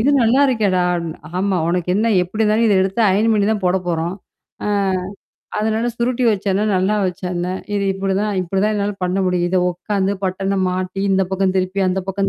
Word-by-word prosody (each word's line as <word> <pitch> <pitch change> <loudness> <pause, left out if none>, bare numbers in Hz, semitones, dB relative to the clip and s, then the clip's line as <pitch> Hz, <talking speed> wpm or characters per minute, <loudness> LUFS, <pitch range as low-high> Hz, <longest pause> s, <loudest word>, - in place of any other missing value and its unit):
"இது 270 +6 +3
நல்லா 235 +4 +3
இருக்கேடா?" 210 -7 +1
அப்டின்னேன் 170 -2 -4 0.2
"ஆமா 195 -1 +1
உனக்கு 180 0 -1
என்னா 225 +2 +2
எப்படி 215 +5 -1
தான் 220 - +2
இத 215 - +3
எடுத்து 195 +4 0
அயன் 215 +4 +2
பண்ணீ 205 -1 +2
தான் 205 -3 -3
போட 180 +1 +2
போறோம், 170 +2 -1 0.5
ஆ. - - 0 0.9
அதனால 220 +2 0
சுருட்டி 245 +1 -1
வச்சா 205 -1 -2
என்னா? 200 +3 +1
நல்லா 190 +3 +1
வச்சா 180 0 -3
என்னா? 175 +1 -2 0.2
இது 200 - 0
இப்படிதான் 195 +2 -1
இப்படிதான் 195 +4 0
என்னால 205 0 -1
பண்ண 180 +2 0
முடியும். 180 -1 +1
இத 185 +1 +1
உக்காந்து, 195 +2 -1
பட்டன 195 +1 -1
மாட்டி 185 +1 -3
இந்த 190 0 +3
பக்கம் 190 0 0
திருப்பி, 185 +1 -1
அந்த 190 +1 0
பக்கம் 195 0 0
195 Hz, 190 wpm, -19 LUFS, 185-210 Hz, 0.9 s, இது